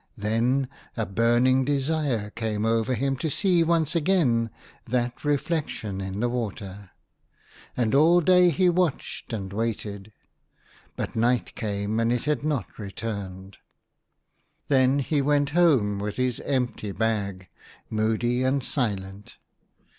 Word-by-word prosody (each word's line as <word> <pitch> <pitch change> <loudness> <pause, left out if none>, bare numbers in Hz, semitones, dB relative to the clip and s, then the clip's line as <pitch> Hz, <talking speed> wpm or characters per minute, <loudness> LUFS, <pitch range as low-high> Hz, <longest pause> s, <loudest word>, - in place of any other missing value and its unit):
Then 120 +6 +1 0.3
a 110 - 0
burning 120 +6 +3
desire 140 -6 0
came 110 -1 -2
over 115 +2 +1
him 135 +3 0
to 160 - -2
see 175 +2 +2
once 165 -1 +1
again 145 -10 +2 0.4
that 120 0 -1
reflection 145 - -1
in 95 +2 -4
the 120 - +2
water, 105 -5 -5 0.9
and 120 -3 +1
all 160 +5 +6
day 180 +1 +5
he 180 +3 +2
watched 175 -8 -1
and 100 -4 -4
waited; 105 -2 -3 0.8
but - - -4
night 120 +2 +1
came, 105 0 -2
and 115 0 +2
it 120 -1 0
had 150 -1 0
not 150 -8 -1
26 - - -28 0.2
THE 115 - -3
HUNTER. 100 - -3
returned. 95 +1 -12 1.1
Then 135 -1 +4
he 150 -3 +1
went 145 0 +2
home 135 - +3
with 105 0 -3
his 125 -2 -1
empty 125 -6 -2
bag, 100 -3 -2 0.4
moody 110 +3 0
and 130 +1 +1
silent. 100 -7 -3
120 Hz, 135 wpm, -25 LUFS, 105-145 Hz, 1.1 s, all